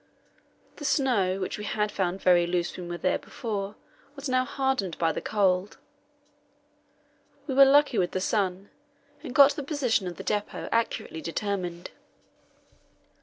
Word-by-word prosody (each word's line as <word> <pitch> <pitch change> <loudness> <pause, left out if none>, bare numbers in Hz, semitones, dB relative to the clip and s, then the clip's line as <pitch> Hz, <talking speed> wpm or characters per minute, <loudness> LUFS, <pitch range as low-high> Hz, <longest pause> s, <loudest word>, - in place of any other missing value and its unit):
The 295 - -7
snow, 220 - +1
which 190 +2 -4
we - - -5
had 210 0 -1
found 190 0 -2
very 175 -1 +4
loose 175 0 -1
when 180 -1 -7
we 175 - -5
were - - -4
there 185 +1 0
before, 205 -3 -5 0.4
was 280 0 -6
now 255 0 +2
hardened 265 - -1
by 165 -1 +2
the - - -4
cold. 195 -2 0 1.7
We 275 - -3
were 275 +1 +8
lucky 275 -4 +4
with 175 -1 +1
the 185 - -2
sun, 195 -1 -1 0.5
and 245 - -8
got 280 0 +8
the 290 - -5
position 265 - 0
of 175 - -5
the - - -7
depot 210 -1 -3
accurately 230 -7 -1
determined. 175 -1 -4
200 Hz, 155 wpm, -27 LUFS, 180-255 Hz, 1.7 s, were